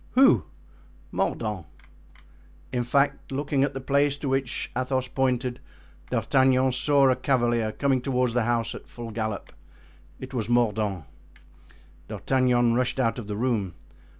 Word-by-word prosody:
"Who?" 185 - +5 0.7
"Mordaunt." 105 -7 -2 1.1
In 125 - +1
fact, 140 +4 0
looking 140 0 0
at 140 - -1
the - - -2
place 140 +1 +1
to 140 -1 -3
which 135 -2 -2
Athos 130 0 -1
pointed, 125 -2 -1 0.5
D'Artagnan 130 -1 +3
saw 140 +2 +3
a - - +2
cavalier 120 -4 +1
coming 135 +1 +1
toward 125 -2 0
the 120 -1 +1
house 120 -1 0
at - - -10
full 120 -1 -8
gallop. 110 -1 -4 0.7
It 130 +1 -8
was 115 -4 -2
Mordaunt. 105 - +1 1.0
D'Artagnan 125 -3 +2
rushed 125 +2 0
out 120 -1 +1
of 110 - -8
the 105 -1 -4
room. 110 -7 -1
125 Hz, 135 wpm, -26 LUFS, 115-135 Hz, 1.1 s, Who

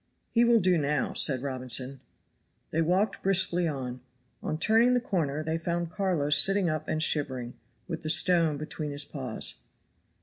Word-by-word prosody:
"He 235 - +3
will 235 -1 +4
do 180 -3 +2
now," 145 -1 -1
said 130 -3 +2
Robinson. 130 0 0 0.7
They 165 - 0
walked 185 +5 0
briskly 180 -2 +2
on. 130 -4 -5 0.4
On 155 - -4
turning 225 +8 +3
the - - +2
corner 155 - -3
they 160 +1 -3
found 170 0 -3
Carlo 180 -8 -2
sitting 195 +1 +4
up 155 0 -5
and 155 0 +1
shivering, 130 -6 0 0.3
with 165 -3 -6
the 155 - -5
stone 165 -2 +3
between 155 0 -6
his 145 0 0
paws. 130 -7 -2
155 Hz, 160 wpm, -27 LUFS, 140-180 Hz, 0.7 s, will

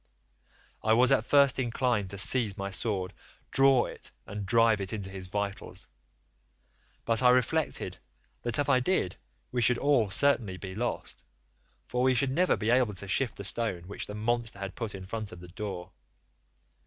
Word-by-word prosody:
I 110 - +3
was 125 +2 +5
at 110 - +3
first 140 -1 +4
inclined 120 -5 0
to 100 - -4
seize 105 0 +1
my 100 0 -4
sword, 95 -2 -2 0.4
draw 135 -2 +5
it, - - -9
and 100 -1 -6
drive 115 -1 +4
it 95 +1 -3
into 100 -3 -5
his 95 -1 -6
vitals, 100 +1 -4 1.2
but 115 0 +1
I 125 - +6
reflected 125 +5 +1 0.4
that 120 -2 -1
if 145 - +1
I 135 -3 +4
did 125 - 0 0.3
we 125 - 0
should 120 +1 +4
all 135 -7 +2
certainly 110 -3 +2
be 95 0 -7
lost, 120 +5 -4 0.6
for 125 - -2
we 130 0 +4
should 135 +1 +1
never 180 +6 +2
be 110 +1 0
able 120 -5 +3
to 100 +2 -5
shift 120 +5 +1
the - - -6
stone 95 -3 -2
which 100 +3 -6
the 105 - -6
monster 115 0 -1
had 100 -1 -5
put 115 -5 -5
in 95 -1 -8
front 110 +1 -5
of 90 - -10
the 90 0 -11
door. 95 -2 -6
110 Hz, 180 wpm, -29 LUFS, 100-125 Hz, 1.2 s, I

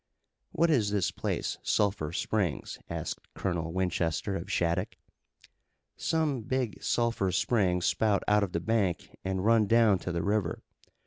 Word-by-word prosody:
"What 170 0 +2
is 115 -9 +3
this 100 -3 +1
place, - - -3
Sulphur 95 -7 0
Springs?" - - -2
asked - - -4 0.2
Colonel 85 -4 -2
Winchester 90 +1 -1
of 85 - -5
Shattuck. 85 0 0 1.0
"Some 155 -6 0
big 125 -1 -2
sulphur 115 -5 +1
springs 90 -5 +1
spout 105 -2 +2
out 105 0 +4
of 95 -3 -2
the 85 - -1
bank 100 -4 -1
and 95 0 -2
run 115 -2 +4
down 115 -3 +4
to 90 - -4
the 85 -1 -2
river. 100 -4 -1
100 Hz, 140 wpm, -29 LUFS, 90-115 Hz, 1.0 s, out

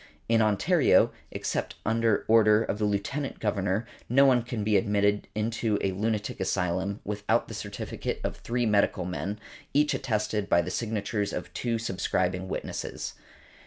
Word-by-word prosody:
In 115 0 +4
Ontario, 130 - +4 0.2
except - - -3
under 115 -1 +2
order 110 -1 +5
of 105 - -3
the 105 - +1
Lieutenant 130 +8 -2
Governor, 100 0 0 0.2
no 135 +4 +6
one 130 -3 +5
can 115 -2 -4
be 105 0 +2
admitted 100 +1 +2
into 110 0 0
a 95 - +1
lunatic 105 +2 -2
asylum 95 +1 -1
without 105 0 0
the - - -8
certificate - - -4
of - - -3
three 120 0 -1
medical 100 -3 +2
men, 95 +3 -3 0.4
each 150 +1 +4
attested 105 -4 -1
by 85 - +4
the 90 - -4
signatures 105 -1 -2
of - - -5
two 120 -2 -1
subscribing 95 -3 -1
witnesses. - - -4
105 Hz, 150 wpm, -28 LUFS, 100-115 Hz, 0.4 s, no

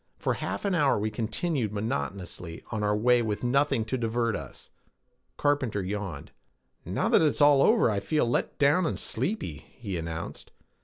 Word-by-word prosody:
For - - 0
half - - -4
an 200 - +1
hour 145 -6 +3
we 110 +1 -1
continued 115 - -1
monotonously 90 -4 -4
on 110 -2 -2
our 105 0 +1
way 120 +2 +4
with 110 -1 -2
nothing 135 -1 +2
to 130 +3 -2
divert 115 -1 0
us. - - -9 0.7
Carpenter 130 -9 0
yawned. 95 -6 -5 0.5
"Now - - -1
that - - +5
it's 155 -3 +2
all 145 -2 +6
over, 220 +6 +5
I 105 -3 +1
feel 150 +5 0
let 120 - -1
down 150 +5 +3
and - - -2
sleepy," 130 - -2 0.2
he 100 -6 -4
announced. 80 0 -6
115 Hz, 165 wpm, -28 LUFS, 105-145 Hz, 0.7 s, all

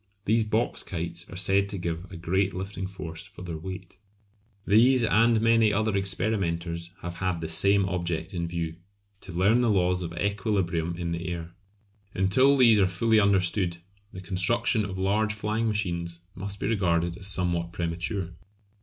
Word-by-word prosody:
These 110 +1 +2
box 110 +2 0
kites 85 -1 -5
are - - -9
said 100 +1 +2
to 100 - -4
give 85 +1 -4
a 95 - -7
great 95 +3 0
lifting 95 0 -4
force 90 -1 -7
for 100 -3 -12
their 85 -2 -5
weight. 95 +2 -8 0.7
These 120 +5 +5
and 115 +1 +4
many 115 -1 +4
other 110 0 0
experimenters 85 -4 -1
have 90 0 -5
had 95 -3 -1
the 80 - -4
same 100 +4 +3
object 85 -2 -3
in 85 -2 -2
view 85 -1 -4 0.4
to 95 - -10
learn 100 +8 +3
the 120 - +2
laws 90 -3 +2
of 85 -2 -4
equilibrium 95 -4 -1
in 85 -1 -3
the 85 +1 -4
air. 85 -1 -5 0.6
Until 130 +10 +4
these 115 -5 +6
are 95 - +4
fully 110 +5 +2
understood 95 -3 +1 0.3
the 95 - -8
construction 100 +4 +1
of 95 -1 -6
large 105 +3 +1
flying 110 +2 -1
machines 85 -5 -3
must 100 +2 -7
be - - -3
regarded 85 -5 +1
as 95 -1 -6
somewhat 85 -3 -1
premature. 85 +2 -3
95 Hz, 165 wpm, -27 LUFS, 85-105 Hz, 0.7 s, these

